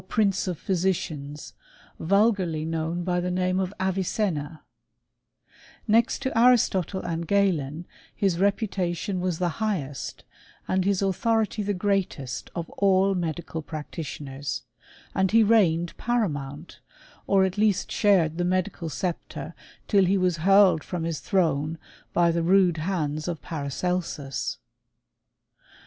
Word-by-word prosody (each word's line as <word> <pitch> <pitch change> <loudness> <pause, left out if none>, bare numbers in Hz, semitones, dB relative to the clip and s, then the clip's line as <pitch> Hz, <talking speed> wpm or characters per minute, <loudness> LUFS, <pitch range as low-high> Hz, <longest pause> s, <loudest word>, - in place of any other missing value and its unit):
prince 200 -4 +1
of 180 -3 -2
physicians, 160 -6 -2 0.5
vulgarly 190 -4 +2
known 165 +2 -2
by 180 0 0
the 180 +1 -1
name 185 +1 0
of 190 -1 -1
Avicenna, 185 -5 -1 1.2
Next 230 +5 +2
to 265 - -2
Aristotle 225 -6 +3
and 170 -1 -3
Galen, 170 -6 +1 0.3
his 190 -4 +1
reputation 195 -2 0
was 180 -2 -1
the 175 +4 -2
highest, 145 -11 -3 0.4
and 185 0 +1
his 200 -1 +1
authority 220 +3 +1
the 205 0 -1
greatest 180 -10 -2
of 170 -1 -3
all 195 0 +4
medical 170 -2 -3
practitioners; 145 -3 -6 0.5
and 190 0 +2
he 225 +2 +5
reigned 175 -6 +3
paramount, 160 - -2 0.5
or 195 -1 +4
at 190 +2 -3
least 210 -3 +2
shared 175 -6 +3
the - - +2
medical 180 -1 -1
sceptre 165 +5 -4 0.3
till 200 -3 +4
he 195 +2 +2
was 180 -2 +1
hurled 190 -1 +5
from 175 -3 -4
his 165 -2 -2
throne 160 -4 0 0.3
by 170 -1 +3
the 170 0 0
rude 180 0 +4
hands 155 -3 -2
of 170 -3 -3
Paracelsus. 150 -1 -3
180 Hz, 125 wpm, -26 LUFS, 160-195 Hz, 1.2 s, he